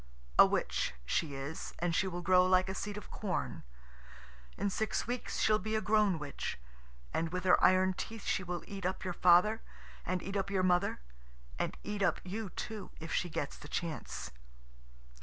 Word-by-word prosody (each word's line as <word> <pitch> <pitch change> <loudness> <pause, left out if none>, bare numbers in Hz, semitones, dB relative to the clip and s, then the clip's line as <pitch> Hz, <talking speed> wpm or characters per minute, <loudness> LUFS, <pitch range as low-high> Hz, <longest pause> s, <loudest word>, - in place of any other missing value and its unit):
A - - +11
witch - - 0
she 145 - 0
is, 140 +4 -5
and 175 -1 0
she 190 - +2
will 175 -1 -4
grow 180 0 +6
like 185 0 +4
a - - -1
seed 205 +1 -4
of 210 - -9
corn. 195 -5 -2 1.0
In 200 - 0
six 220 +2 -1
weeks 245 +1 -3
she'll 215 0 +4
be 215 +3 -2
a - - +3
grown 210 -4 +3
witch, 145 -2 -4 0.6
and 165 0 0
with 180 +1 -3
her 185 - +5
iron 185 0 +5
teeth 225 +3 -6
she - - +1
will 175 -1 -4
eat 195 -1 -7
up 185 +1 -1
your 180 -2 -2
father, 180 +6 +5 0.4
and 180 0 -2
eat 195 +2 -5
up 195 0 0
your 190 -2 +1
mother, 180 - +2 0.6
and - - -1
eat 210 -1 -4
up 175 -4 +2
you 205 +3 -4
too, 215 +3 -6
if 165 +1 -5
she 175 - 0
gets 145 -2 -3
the - - -11
chance. 155 - -4
185 Hz, 185 wpm, -33 LUFS, 175-205 Hz, 1.0 s, A